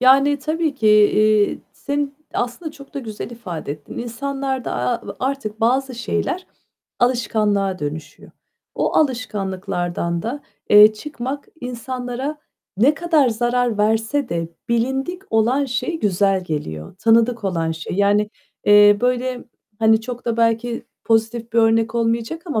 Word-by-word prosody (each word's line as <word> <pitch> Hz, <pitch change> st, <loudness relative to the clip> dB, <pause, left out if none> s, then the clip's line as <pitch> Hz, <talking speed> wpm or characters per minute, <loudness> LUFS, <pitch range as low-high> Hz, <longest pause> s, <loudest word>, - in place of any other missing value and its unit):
Yani, 275 Hz, +3 st, +5 dB
tabii 310 Hz, +1 st, -1 dB
ki. 225 Hz, -, -1 dB
Eee, 210 Hz, 0 st, +4 dB
seni 285 Hz, 0 st, -2 dB, 0.3 s
aslında 245 Hz, +7 st, -3 dB
çok 280 Hz, -3 st, -15 dB
da -, -, -2 dB
güzel 220 Hz, -2 st, -6 dB
ifade 180 Hz, -11 st, -6 dB
ettin. 150 Hz, -1 st, -10 dB
İnsanlarda, 265 Hz, +2 st, -3 dB
a 125 Hz, 0 st, 0 dB
a 200 Hz, -, -9 dB
artık 255 Hz, -5 st, -3 dB
bazı 255 Hz, +3 st, +1 dB
şeyler 240 Hz, -, -2 dB, 0.5 s
alışkanlığa 210 Hz, -6 st, +1 dB
dönüşüyor. 150 Hz, +2 st, -6 dB, 0.4 s
O -, -, -1 dB
alışkanlıklardan 190 Hz, -, -1 dB
da, 255 Hz, +6 st, -4 dB, 0.3 s
eee, 210 Hz, +1 st, +9 dB
çıkmak 270 Hz, +3 st, -6 dB
insanlara 250 Hz, +3 st, -4 dB, 0.4 s
ne 260 Hz, +9 st, +4 dB
kadar 315 Hz, -4 st, +2 dB
zarar 240 Hz, 0 st, 0 dB
verse 225 Hz, +6 st, +1 dB
de 165 Hz, -1 st, -2 dB, 0.2 s
bilindik 265 Hz, +10 st, -1 dB
olan 235 Hz, +6 st, +2 dB
şey 275 Hz, +6 st, -2 dB
güzel 195 Hz, -1 st, +2 dB
geliyor, 80 Hz, -, -5 dB
tanıdık 230 Hz, +1 st, +3 dB
olan 165 Hz, -4 st, 0 dB
şey. 165 Hz, +2 st, -6 dB
Yani, 205 Hz, +1 st, +2 dB, 0.3 s
eee, 205 Hz, 0 st, +7 dB
böyle, 250 Hz, 0 st, 0 dB, 0.3 s
hani, 220 Hz, 0 st, +4 dB
çok 245 Hz, +1 st, -7 dB
da 235 Hz, -1 st, -1 dB
belki 230 Hz, +1 st, 0 dB, 0.2 s
pozitif 225 Hz, 0 st, 0 dB
bir 235 Hz, -, +2 dB
örnek 225 Hz, 0 st, +3 dB
olmayacak 230 Hz, +7 st, -1 dB
ama 295 Hz, -10 st, -1 dB
230 Hz, 135 wpm, -21 LUFS, 210-260 Hz, 0.5 s, eee